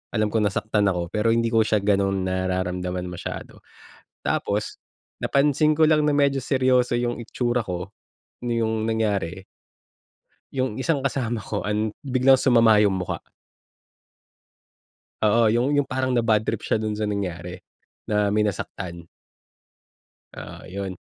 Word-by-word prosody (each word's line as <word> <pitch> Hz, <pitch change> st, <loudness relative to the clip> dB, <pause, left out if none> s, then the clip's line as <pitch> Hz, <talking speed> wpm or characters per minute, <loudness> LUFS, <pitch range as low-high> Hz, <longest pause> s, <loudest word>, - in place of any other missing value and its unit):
alam 110 Hz, -1 st, +1 dB
ko 110 Hz, -, +1 dB
nasaktan 105 Hz, 0 st, +1 dB
ako 90 Hz, -3 st, -1 dB
pero 110 Hz, +2 st, +2 dB
hindi 115 Hz, 0 st, +1 dB
ko 115 Hz, -1 st, +4 dB
siya 105 Hz, -2 st, +1 dB
ganun 100 Hz, -1 st, +1 dB
nararamdaman 90 Hz, -1 st, -2 dB
masyado. 90 Hz, -, -7 dB, 0.6 s
Tapos 105 Hz, +1 st, -2 dB, 0.4 s
napansin 150 Hz, +2 st, +2 dB
ko 155 Hz, +1 st, +4 dB
lang 150 Hz, -1 st, +3 dB
na 150 Hz, -, +2 dB
medyo 140 Hz, -1 st, +2 dB
seryoso 130 Hz, -2 st, +2 dB
yung 120 Hz, 0 st, -1 dB
itsura 120 Hz, +1 st, -1 dB
ko, 90 Hz, +1 st, -4 dB, 0.6 s
na 120 Hz, -, 0 dB
yung 110 Hz, 0 st, -1 dB
nangyari, 100 Hz, -5 st, -1 dB, 1.1 s
yung 130 Hz, -4 st, -1 dB
isang 150 Hz, -1 st, 0 dB
kasama 120 Hz, -4 st, -1 dB
ko -, -, -3 dB
an 105 Hz, 0 st, -1 dB
biglang 130 Hz, 0 st, +4 dB
sumama 115 Hz, -4 st, +5 dB
yung 100 Hz, -2 st, +2 dB
mukha. 90 Hz, -2 st, -4 dB, 2.0 s
Oo, 110 Hz, +1 st, +4 dB
yung 125 Hz, +5 st, +1 dB
yung 145 Hz, -, +3 dB
parang 130 Hz, -1 st, -1 dB
nabadtrip 110 Hz, -2 st, +1 dB
siya 110 Hz, -, 0 dB
dun 110 Hz, -1 st, -2 dB
sa 105 Hz, -, -2 dB
nangyari, 90 Hz, -4 st, -4 dB, 0.5 s
na 105 Hz, -1 st, +1 dB
may 105 Hz, -, +2 dB
nasaktan. 90 Hz, -4 st, -3 dB, 1.3 s
Oo, -, -, -9 dB
yun. 95 Hz, 0 st, -4 dB
110 Hz, 135 wpm, -24 LUFS, 100-125 Hz, 2.0 s, sumama